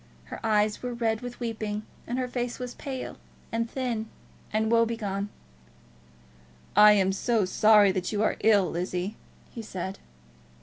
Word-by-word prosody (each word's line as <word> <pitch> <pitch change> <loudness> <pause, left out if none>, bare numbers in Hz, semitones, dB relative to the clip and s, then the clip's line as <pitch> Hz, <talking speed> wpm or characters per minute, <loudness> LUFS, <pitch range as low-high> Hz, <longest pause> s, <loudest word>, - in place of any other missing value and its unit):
Her - - -9
eyes 210 -1 +2
were 245 -1 -4
red 225 -2 0
with 245 -1 -7
weeping, 215 -3 -3 0.2
and 245 - -2
her 255 -1 -1
face 245 -1 -3
was 250 -1 -5
pale, 265 -2 -6 0.3
and 230 0 -1
thin, 235 -4 -3 0.4
and 220 +1 +1
woe 230 0 +5
begone. 205 -3 -2 1.5
"I 210 +1 +9
am 195 -2 +3
so 215 +1 +1
sorry 210 +1 +5
that 185 -1 -2
you 210 0 0
are - - +2
ill, 205 -3 +4
Lizzie," 180 +4 -3 0.4
he 230 - -6
said. 190 -2 -5
220 Hz, 150 wpm, -27 LUFS, 200-235 Hz, 1.5 s, I